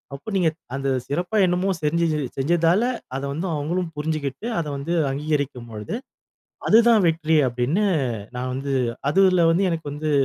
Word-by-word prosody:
அப்ப 210 Hz, +10 st, -8 dB
நீங்க, 180 Hz, -4 st, +3 dB, 0.3 s
அந்த 135 Hz, 0 st, -1 dB, 0.2 s
சிறப்பா 180 Hz, +9 st, -2 dB
என்னமோ 180 Hz, +2 st, +1 dB
செஞ்சி 170 Hz, +3 st, +1 dB, 0.3 s
செஞ்சதால 170 Hz, -, +3 dB, 0.3 s
அத 135 Hz, -, -2 dB
வந்து 165 Hz, +6 st, -3 dB
அவுங்களும் 165 Hz, +4 st, -2 dB
புரிஞ்சுகிட்டு, 150 Hz, -, -3 dB
அத 160 Hz, -, -2 dB
வந்து 140 Hz, +5 st, -3 dB, 0.2 s
அங்கீகரிக்கும்பொழுது, 135 Hz, -, -3 dB, 0.7 s
அதுதான் 230 Hz, -1 st, +6 dB
வெற்றி 160 Hz, -1 st, +1 dB
அப்படின்னு 125 Hz, +12 st, 0 dB, 0.5 s
நான் 125 Hz, +1 st, -3 dB
வந்து 135 Hz, +1 st, -2 dB, 0.4 s
அதில 185 Hz, -1 st, +4 dB
வந்து 185 Hz, +4 st, +2 dB
எனக்கு 160 Hz, -3 st, -3 dB
வந்து 155 Hz, +1 st, -3 dB
160 Hz, 135 wpm, -23 LUFS, 140-180 Hz, 0.7 s, அதுதான்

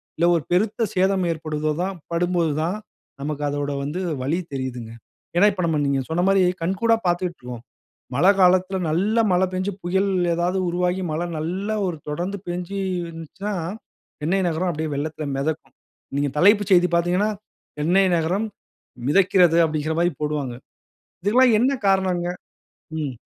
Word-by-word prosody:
இல்ல, 170 Hz, -, +2 dB
ஒரு 160 Hz, -, -4 dB
பெருத்த 215 Hz, +5 st, +2 dB
சேதம் 190 Hz, 0 st, +2 dB
ஏற்படும்போது 155 Hz, -1 st, -2 dB
தான் 195 Hz, +1 st, -2 dB, 0.2 s
படும்போது 170 Hz, -1 st, +1 dB
தான், 175 Hz, +5 st, -1 dB, 0.5 s
நமக்கு 150 Hz, +1 st, -3 dB
அதோட 145 Hz, 0 st, -2 dB
வந்து 150 Hz, +6 st, -3 dB, 0.2 s
வலி 155 Hz, +7 st, 0 dB
தெரியுதுங்க. 125 Hz, -4 st, -4 dB, 0.5 s
ஏன்னா, 200 Hz, +4 st, +6 dB
இப்ப, 185 Hz, -, -3 dB
நம்ம, 160 Hz, -2 st, +1 dB
நீங்க 140 Hz, -1 st, +1 dB
சொன்ன 170 Hz, +2 st, +1 dB
மாரி 195 Hz, 0 st, +4 dB, 0.2 s
கண்கூடா 205 Hz, +6 st, +2 dB
பார்த்துக்கிட்டுருக்கோம். 170 Hz, -10 st, -3 dB, 0.5 s
மழை 180 Hz, +9 st, +6 dB
காலத்தில 185 Hz, +1 st, +4 dB
நல்ல 195 Hz, +8 st, +1 dB
மழை 180 Hz, +1 st, +3 dB
பெஞ்சு, 185 Hz, +2 st, -1 dB
புயல் 190 Hz, +3 st, +1 dB, 0.3 s
ஏதாவது 175 Hz, +2 st, 0 dB
உருவாகி 180 Hz, +1 st, 0 dB
மழை 160 Hz, +3 st, -1 dB
நல்லா 185 Hz, +7 st, -2 dB
ஒரு 175 Hz, -3 st, -3 dB
தொடர்ந்து 175 Hz, +7 st, -3 dB
பெய்ஞ்சு 180 Hz, +2 st, -4 dB, 0.3 s
இருந்துச்சுன்னா, 165 Hz, +6 st, -6 dB, 0.7 s
சென்னை 180 Hz, +6 st, +1 dB
நகரம் 170 Hz, +2 st, 0 dB
அப்படியே 155 Hz, -1 st, -3 dB
வெள்ளத்தில 155 Hz, +1 st, -3 dB
மெதக்கும். 155 Hz, +3 st, -3 dB, 0.4 s
நீங்க 145 Hz, 0 st, +1 dB
தலைப்பு 205 Hz, +6 st, +5 dB
செய்தி 180 Hz, -1 st, +6 dB
பார்த்தீங்கன்னா, 180 Hz, +5 st, +2 dB, 0.5 s
"சென்னை 180 Hz, +6 st, +3 dB
நகரம் 180 Hz, +7 st, 0 dB, 0.6 s
மிதக்கிறது" 180 Hz, -1 st, +4 dB
அப்படின்கிற 155 Hz, 0 st, -2 dB
மாரி 175 Hz, +1 st, +2 dB
போடுவாங்க. 150 Hz, -4 st, -2 dB, 0.7 s
இதல்லாம் 240 Hz, +4 st, +5 dB
என்ன 255 Hz, +4 st, +3 dB, 0.2 s
காரணம்னங்க? 185 Hz, -2 st, +1 dB, 0.7 s
ம். 140 Hz, -3 st, -3 dB
175 Hz, 140 wpm, -23 LUFS, 155-190 Hz, 0.7 s, ஏன்னா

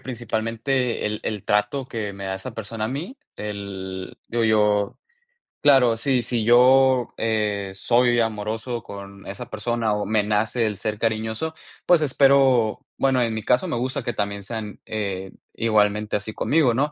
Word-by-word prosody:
principalmente 120 Hz, +1 st, -2 dB
el 105 Hz, 0 st, -3 dB
el 105 Hz, -3 st, -3 dB
trato 105 Hz, +6 st, 0 dB
que 110 Hz, -5 st, -4 dB
me 100 Hz, 0 st, -8 dB
da 95 Hz, 0 st, -2 dB
esa 95 Hz, -, -7 dB
persona 110 Hz, 0 st, -4 dB
a -, -, -4 dB
mí. 160 Hz, -, -5 dB, 0.2 s
El 95 Hz, -3 st, -6 dB
digo 120 Hz, 0 st, 0 dB
yo, 105 Hz, -2 st, +2 dB, 0.6 s
claro, 130 Hz, -5 st, +5 dB
si 130 Hz, 0 st, +1 dB
si 120 Hz, -1 st, -1 dB
yo, 125 Hz, +2 st, +5 dB
eh, 105 Hz, -3 st, -1 dB
soy 120 Hz, +3 st, +3 dB
amoroso 115 Hz, +2 st, -2 dB
con 100 Hz, -1 st, -10 dB
esa 100 Hz, 0 st, -7 dB
persona 115 Hz, 0 st, -1 dB
o 105 Hz, 0 st, -1 dB
me 110 Hz, 0 st, +2 dB
nace 110 Hz, +3 st, +1 dB
el 105 Hz, -2 st, -2 dB
ser 105 Hz, +2 st, -2 dB
cariñoso, 110 Hz, +7 st, -1 dB, 0.3 s
pues 175 Hz, -3 st, +5 dB
espero, 135 Hz, -5 st, +3 dB
bueno, 135 Hz, -2 st, +2 dB
en 115 Hz, -2 st, 0 dB
mi 110 Hz, -, -4 dB
caso, 125 Hz, +3 st, +2 dB
me -, -, -2 dB
gusta 130 Hz, +2 st, -2 dB
que 120 Hz, -, -2 dB
también 100 Hz, -1 st, -3 dB
sean, 110 Hz, 0 st, -6 dB
eh, 95 Hz, -3 st, -3 dB, 0.2 s
igualmente 105 Hz, -1 st, +1 dB
así 105 Hz, +1 st, -3 dB
conmigo, 145 Hz, -2 st, +2 dB
¿no? 140 Hz, +5 st, 0 dB
110 Hz, 165 wpm, -23 LUFS, 105-125 Hz, 0.6 s, claro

